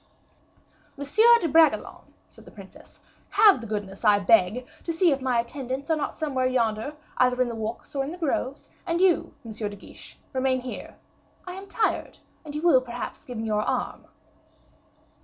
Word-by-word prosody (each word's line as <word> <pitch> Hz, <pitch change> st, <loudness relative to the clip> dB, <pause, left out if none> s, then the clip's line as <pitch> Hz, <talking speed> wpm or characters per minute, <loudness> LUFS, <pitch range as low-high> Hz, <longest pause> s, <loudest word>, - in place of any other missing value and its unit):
"Monsieur 435 Hz, +12 st, +5 dB
de 335 Hz, -, +1 dB
Bragelonne," 320 Hz, +1 st, +2 dB, 0.2 s
said -, -, -18 dB
the -, -, -12 dB
princess, -, -, -15 dB, 0.3 s
"have 415 Hz, -, +5 dB
the 230 Hz, -, -7 dB
goodness, 205 Hz, -1 st, -5 dB
I 210 Hz, -2 st, +6 dB
beg, 215 Hz, +3 st, +3 dB, 0.2 s
to 335 Hz, -, -2 dB
see 335 Hz, +1 st, +3 dB
if 275 Hz, -1 st, 0 dB
my 255 Hz, -2 st, +1 dB
attendants 260 Hz, +4 st, -4 dB
are -, -, +4 dB
not 300 Hz, -, -4 dB
somewhere 265 Hz, -5 st, 0 dB
yonder, 235 Hz, +2 st, -1 dB, 0.2 s
either 250 Hz, 0 st, +3 dB
in 255 Hz, -1 st, +2 dB
the -, -, -4 dB
walks 220 Hz, +1 st, -6 dB
or 275 Hz, -1 st, 0 dB
in 275 Hz, -, -4 dB
the 350 Hz, -, -7 dB
groves; 285 Hz, -4 st, -3 dB, 0.2 s
and 335 Hz, 0 st, 0 dB
you, 370 Hz, -2 st, +2 dB
M. 225 Hz, -, -7 dB
de 210 Hz, -1 st, -4 dB
Guiche, 200 Hz, -, -13 dB, 0.2 s
remain 260 Hz, -1 st, +1 dB
here: 250 Hz, 0 st, -8 dB, 0.5 s
I 360 Hz, -, -6 dB
am 385 Hz, +2 st, -9 dB
tired, 435 Hz, -, -1 dB, 0.3 s
and 295 Hz, -2 st, -8 dB
you 300 Hz, -, -4 dB
will 305 Hz, -7 st, +5 dB
perhaps 245 Hz, -1 st, -7 dB
give 245 Hz, -2 st, -7 dB
me 220 Hz, -, -3 dB
your 210 Hz, -1 st, 0 dB
arm." 245 Hz, +2 st, -3 dB
260 Hz, 180 wpm, -25 LUFS, 230-315 Hz, 0.5 s, I